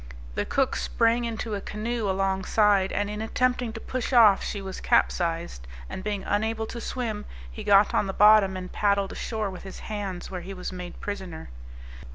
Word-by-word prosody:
the - - -1
cook 270 -1 +1
sprang 230 +1 +1
into 225 -1 -3
a 200 - -2
canoe 220 +1 -3
along 190 0 0
side, 205 -2 +3
and 205 0 0
in 210 +1 -4
attempting 250 +1 0
to 225 - -7
push 255 +2 -4
off 220 -6 +6
she 205 - -3
was 190 -1 -7
capsized; 165 - 0 0.2
and 185 - -6
being 205 -2 -2
unable 220 +2 0
to 235 +1 -7
swim, 225 -5 -3 0.3
he - - -7
got 200 0 +5
on 200 - +2
the - - -1
bottom, 205 -1 +6
and 185 0 -7
paddled 200 -1 +1
ashore 215 -3 -3
with 185 - -9
his 190 - -9 0.2
hands, 195 -4 -4
where 180 -2 -4
he 195 +3 -7
was 180 - -5
made 180 -1 -8
prisoner. 190 - -6
205 Hz, 190 wpm, -26 LUFS, 190-220 Hz, 0.3 s, off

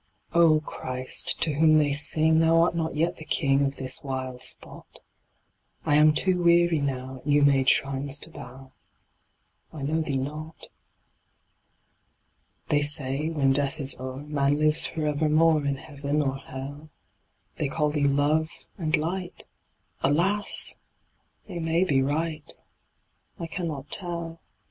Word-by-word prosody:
Oh, 165 -2 +4
Christ, 130 -4 -4
to 155 - +2
whom 155 +1 +4
they 145 -2 +2
sing, 155 +2 +3
Thou 165 0 +4
art 170 0 +1
not 160 -2 -2
yet 165 +3 -1
the - - -10
King 140 -3 +1
Of 140 0 -2
this 130 -1 +2
wild 130 -2 -5
spot; - - -2 0.8
I - - +1
am 150 +1 +6
too 180 +3 +1
weary 170 -1 +3
now 130 -1 -4
At 130 - -14
new 145 0 +3
made 135 -2 +3
shrines 135 +1 0
to 165 - -11
bow; 130 -1 -12 1.0
I 155 -4 -8
know 155 +3 -1
Thee 145 -3 -2
not. 150 +4 -7 2.0
They 145 - +3
say, 145 0 -1
when 140 -4 +1
death 145 +2 +1
is 135 -1 +1
o'er 130 +2 -7
Man 145 -1 0
lives 155 +1 +3
for 155 -1 -4
evermore 155 +1 +2
In 140 -1 -1
heaven 145 +1 -3
or 135 -1 -2
hell; 140 +3 -9 0.7
They 150 - -1
call 150 +1 0
Thee 145 -1 +1
Love 145 +3 +1 0.3
and 160 -1 +1
Light 175 +3 -4 0.6
Alas! 195 +8 +2 0.7
they 175 - -6
may 165 +2 +1
be 140 -7 +1
right, 155 +2 -2 0.9
I 170 - -5
cannot 160 -5 -5
tell. 170 -2 -3
150 Hz, 145 wpm, -25 LUFS, 140-160 Hz, 2.0 s, am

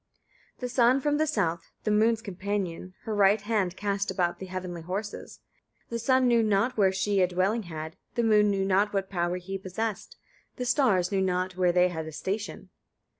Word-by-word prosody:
5. - - -31
The 250 - -2
sun 245 +2 +4
from 295 +2 +1
the 310 +1 +1
south, 170 - -1
the 215 - 0
moon's 220 +1 +3
companion, 190 -2 -4
her 220 - -3
right 205 +1 +4
hand 200 -4 -1
cast 200 -1 -1
about 180 -2 0
the 190 - -7
heavenly 180 -2 -5
horses. 195 +5 -6 0.5
The 235 - -3
sun 260 +2 +3
knew 235 -1 +4
not 215 +4 +1
where 195 -3 +4
she 195 +1 +1
a 180 - +4
dwelling 185 +6 0
had, 160 0 -6 0.2
the 235 - +1
moon 210 -2 +4
knew 195 -1 0
not 195 +2 +2
what 195 -1 -2
power 175 -1 0
he 195 +2 -5
possessed, 200 +3 -4 0.4
the 250 - -4
stars 230 -8 +2
knew 195 -1 +1
not 185 0 -1
where 180 -1 +3
they 180 +1 +4
had 160 -2 -5
a - - -6
station. 200 +7 -4
195 Hz, 195 wpm, -27 LUFS, 180-220 Hz, 0.5 s, sun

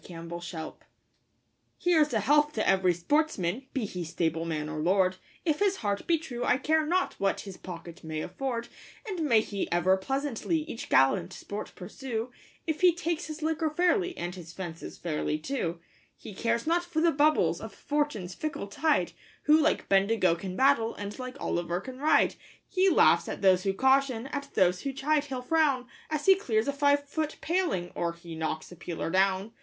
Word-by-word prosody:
A 180 - -11
Hunting 170 +1 -7
Song 165 -2 -6 1.0
Here's 315 -4 +3
a 220 -3 +1
health 295 +6 +3
to 215 - -1
every 190 -1 +4
sportsman, 255 - 0
be 255 -5 -2
he 180 -3 -5
stableman 160 -1 -2
or 155 0 -4
lord, 185 +3 +2 0.3
If 310 -3 +1
his 400 -1 +3
heart 205 - -2
be 335 - +4
true, 250 -6 -5
I 245 - +3
care 315 +3 +2
not 365 +3 +1
what 195 0 +1
his 195 -2 -8
pocket 175 -1 -9
may 155 -1 -4
afford; 240 0 -3 0.4
And 375 -5 -3
may 235 -8 +4
he 200 -2 -4
ever 175 +2 +3
pleasantly 275 - -1
each 305 -7 -7
gallant 170 +8 +3
sport 205 +3 -7
pursue, 230 +5 -5 0.3
If 315 0 -2
he 360 -2 +6
takes 340 -1 -2
his 310 0 -7
liquor 320 0 0
fairly, 360 +3 +1
and 175 +1 -4
his 175 -3 -10
fences 170 -3 -7
fairly, 155 -2 -2
too. 170 - -3 0.4
He - - -10
cares 230 +3 -1
not 340 +2 +2
for 345 -2 -2
the 335 +1 +4
bubbles 300 +2 +2
of - - -7
Fortune's 290 -12 -2
fickle 305 - -4
tide, 310 +9 +1 0.3
Who 300 - +6
like - - +1
Bendigo 195 -2 +3
can 185 +2 -5
battle, 260 -3 +3
and 205 +4 -6
like 255 +1 -6
Olliver 175 - -2
can 255 +5 -9
ride. 300 +2 +4 0.3
He 385 0 +3
laughs - - +4
at - - -6
those 185 -1 +4
who 195 - +2
caution, 265 0 +2
at 280 -1 -5
those 180 -1 +3
who 275 - -3
chide 295 +2 +1
he'll 260 -3 -5
frown, 280 -3 +2 0.2
As 305 -2 -2
he 390 - +8
clears 230 - 0
a 280 - 0
five 285 0 +2
foot 310 +1 -2
paling, 330 - -1
or 170 -1 -1
he 170 0 -10
knocks 160 0 -4
a - - -9
peeler 170 -1 -4
down. 190 +3 +2
235 Hz, 185 wpm, -29 LUFS, 180-300 Hz, 1.0 s, he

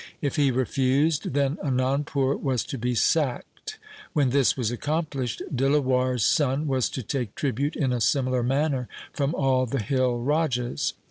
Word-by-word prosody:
If 145 0 -2
he 145 -3 +3
refused, 135 +4 +1
then 140 +1 +1
Anandpur 135 +1 0
was 130 -4 0
to 135 - -6
be 125 +1 -1
sacked. 160 - -1 0.4
When 140 -4 +2
this 140 -1 +3
was 120 -3 -1
accomplished, 140 -2 -2
Dilawar' 130 -1 +2
s 115 - +1
son 145 0 +2
was 130 -4 +1
to 130 - -5
take 120 -2 -3
tribute 140 +2 -1
in 135 -4 0
a 120 - -1
similar 130 +3 +1
manner 135 0 0 0.3
from 145 +3 -1
all 130 -2 +2
the 135 - -2
hill 125 +2 0
rajas. 125 -2 0
135 Hz, 155 wpm, -25 LUFS, 125-145 Hz, 0.4 s, he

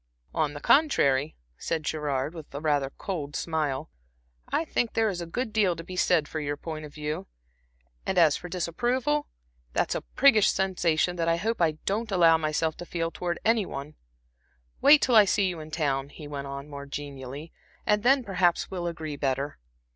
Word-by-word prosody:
"On 150 -2 0
the - - -5
contrary," 150 - +3 0.2
said 160 -2 -2
Gerard, 150 -1 -2
with 160 -3 -9
rather 145 -2 +1
a - - -9
cold 150 -4 -5
smile 155 -3 -2 0.6
"I 320 - 0
think 240 -6 -1
there 225 -1 +2
is 180 -3 -4
a 170 - -5
good 225 +5 -3
deal 200 -5 +3
to 165 - -8
be 185 +2 -8
said 175 -4 +2
for 160 - -4
your 145 -1 -3
point 155 0 -6
of 145 - -12
view 150 -6 -4 0.8
and 190 - -2
as 160 -4 +6
for 180 - -7
disapproval, 245 - 0 0.5
that's - - +1
a - - -2
priggish 240 -7 +4
sensation 180 -2 +1
that 165 -1 0
I 165 - +3
hope 220 +4 -2
I 160 -2 +3
don't 215 +3 -1
allow 170 -3 +6
myself 155 0 0
to 175 - -7
feel 165 -1 -2
towards 175 -1 -3
any 220 -3 +3
one. 140 +2 -6 0.9
Wait 290 +1 +7
till 250 - +3
I 215 -2 +9
see 195 0 +2
you 175 -3 -3
in 155 0 -8
town," 140 -3 -1
he 150 0 -10
went 140 -1 -5
on, 140 +1 -6
more 140 -1 -8
genially 140 +1 -7 0.3
"and 210 0 +3
then 265 +3 +4
perhaps 180 -5 +1
we'll 175 -2 -3
agree 160 -3 -5
better." 135 +1 -2
165 Hz, 190 wpm, -27 LUFS, 145-195 Hz, 0.9 s, I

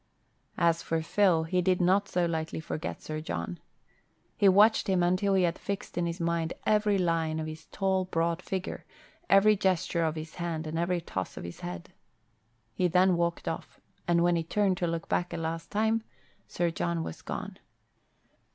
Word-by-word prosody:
As 170 -1 +3
for 160 -1 -1
Phil, 175 -2 +3
he 180 +3 0
did 185 0 +2
not 190 +3 +3
so 180 -1 +1
lightly 160 -1 -2
forget 160 0 -5
Sir 155 0 -4
John. 85 - -4 0.8
He 200 - +5
watched 210 +4 +5
him 185 -2 +2
until 185 +3 +2
he 190 - +3
had 170 -1 0
fixed 200 -1 -5
in 175 -1 0
his 170 0 -4
mind 170 -1 0
every 210 -1 +3
line 165 -3 0
of 160 - -3
his 155 0 -8
tall, 190 -1 0
broad 165 -1 0
figure, 190 0 -4 0.5
every 210 +2 +6
gesture 185 -3 +1
of 160 -1 0
his 155 0 -7
hand 165 -2 -2
and 160 +1 -3
every 175 0 0
toss 95 - -5
of - - -6
his 85 0 -8
head. 85 -1 -7 0.8
He 180 - +1
then 180 +1 +4
walked 170 0 -1
off, - - -5 0.3
and 170 0 +3
when 175 0 +3
he 165 - 0
turned 195 +2 +1
to 175 - 0
look 165 0 -3
back 175 - -1
a - - -3
last 165 0 -4
time 220 +2 +1 0.5
Sir 175 -1 0
John 85 - -1
was 80 0 -7
gone. - - -6
170 Hz, 185 wpm, -29 LUFS, 160-185 Hz, 0.8 s, every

